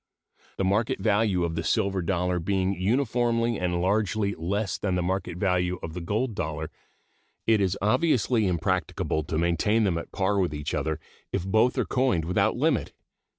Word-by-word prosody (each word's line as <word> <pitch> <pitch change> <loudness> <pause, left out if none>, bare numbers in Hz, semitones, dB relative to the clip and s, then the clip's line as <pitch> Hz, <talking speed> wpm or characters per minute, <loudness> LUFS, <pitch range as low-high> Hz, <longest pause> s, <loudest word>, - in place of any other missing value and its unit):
The - - 0
market 110 +7 +1
value 105 -4 +2
of 85 -1 -1
the 85 +1 -2
silver 95 +3 +1
dollar 90 0 0
being 95 +2 0
uniformly 115 +2 +1
and 90 -1 0
largely 100 +1 +1
less 100 +5 -2
than 95 -3 0
the 90 - 0
market 90 -1 -2
value 90 -1 +1
of 80 - -5
the 90 - -5
gold 110 +8 -1
dollar, 80 -3 -4 0.7
it 110 -2 +3
is 95 0 +1
obviously 120 -2 +2
impracticable 90 -3 -1
to 80 - -2
maintain 85 +7 +2
them 90 -5 +1
at - - -9
par 100 +1 +1
with 90 -5 0
each 75 0 -4
other 80 0 -1 0.3
if 85 - -2
both 110 +6 +2
are - - +1
coined 125 -11 +1
without 100 +6 +1
limit. 145 -1 +1
95 Hz, 170 wpm, -26 LUFS, 85-110 Hz, 0.7 s, it